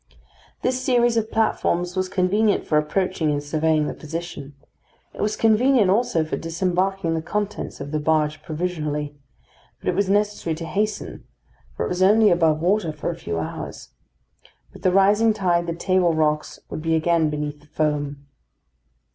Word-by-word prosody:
This 255 0 0
series 240 -2 +3
of 225 -1 0
platforms 180 -5 0
was 185 0 -1
convenient 200 +3 +1
for 150 - +3
approaching 165 +1 -1
and 145 -1 -1
surveying 155 +1 +1
the - - -3
position. 160 -3 -7 0.6
It - - -7
was 210 +1 0
convenient 225 -1 +4
also 205 -7 +1
for 155 - -3
disembarking 180 +1 -1
the 160 - -1
contents 205 +4 -4
of 140 +1 -6
the 155 - 0
barge 155 0 +1
provisionally; 150 -3 -3 0.6
but - - -2
it - - +1
was 200 0 +1
necessary 205 -5 0
to 165 +1 -6
hasten, 210 +6 -3 0.5
for - - -1
it - - -3
was 180 +1 -2
only 210 +3 +5
above 160 -3 +2
water 180 -1 +1
for 155 - -3
a - - -6
few 85 - -4
hours. 80 - -6 0.8
With - - -13
the 185 - +3
rising 205 +4 +4
tide 175 -4 +1
the 170 - -2
table 180 -1 +2
rocks 150 -1 0
would - - -4
be 165 0 +1
again 160 -1 +2
beneath 150 0 -4
the 150 - -22
foam. 145 -2 -2
170 Hz, 165 wpm, -23 LUFS, 155-200 Hz, 0.8 s, only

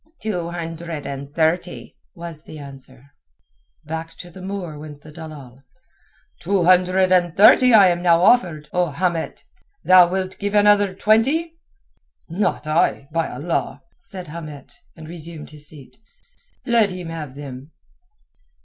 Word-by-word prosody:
"Two 180 -6 -3
hundred 165 -2 -6
and 140 0 -6
thirty," 160 -7 -1 0.2
was 170 -2 -8
the 155 - -10
answer. 135 -1 -12 0.7
Back 160 +1 -6
to 175 - -10
the 185 - -12
Moor 185 -5 -6
went 150 -1 -11
the 155 - -12
dalal. 150 -5 -11 0.8
"Two 195 -3 +1
hundred 185 +1 +4
and 175 -2 +2
thirty 225 +5 +7
I 205 -5 +7
am 175 0 -1
now 170 -1 +4
offered, 170 -10 +3
O 180 -1 +1
Hamet. 165 +2 -2 0.4
Thou 185 -1 +7
wilt 185 +1 -3
give 205 0 -2
another 205 -2 +4
twenty?" 280 - +1 0.7
"Not 175 -1 -1
I, 155 -3 +1
by 165 0 0
Allah!" - - -3
said 190 - -9
Hamet, 155 -3 -9 0.2
and 160 -1 -11
resumed 165 -2 -9
his 150 -1 -7
seat. 145 -4 -11 0.7
"Let 230 -4 +3
him 180 -2 -7
have 155 -5 -7
them." 140 -1 -9
170 Hz, 140 wpm, -21 LUFS, 150-185 Hz, 0.8 s, thirty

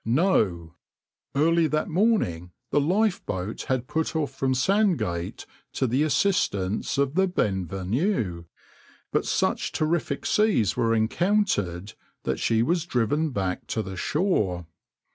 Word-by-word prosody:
No! 110 - +1 0.6
Early 165 +3 +3
that 155 0 -1
morning 155 - +1 0.2
the 145 - +3
lifeboat 160 - -1
had 130 -1 -1
put 160 +1 -2
off 150 -4 -1
from 135 -1 0
Sandgate 130 - 0 0.3
to - - 0
the 130 +3 +1
assistance 135 - +1
of 140 0 +1
the 190 +3 +3
{\itshape{Benvenue}}, 95 - -1 0.7
but - - 0
such - - 0
terrific 155 -2 -1
seas 210 - +2
were 115 0 +2
encountered 110 - 0 0.3
that - - -2
she 115 0 +2
was 170 +5 0
driven 145 +5 +1
back 95 -7 -3
to 110 - -2
the 95 -1 -7
shore. 100 - 0
130 Hz, 125 wpm, -25 LUFS, -, 0.7 s, Early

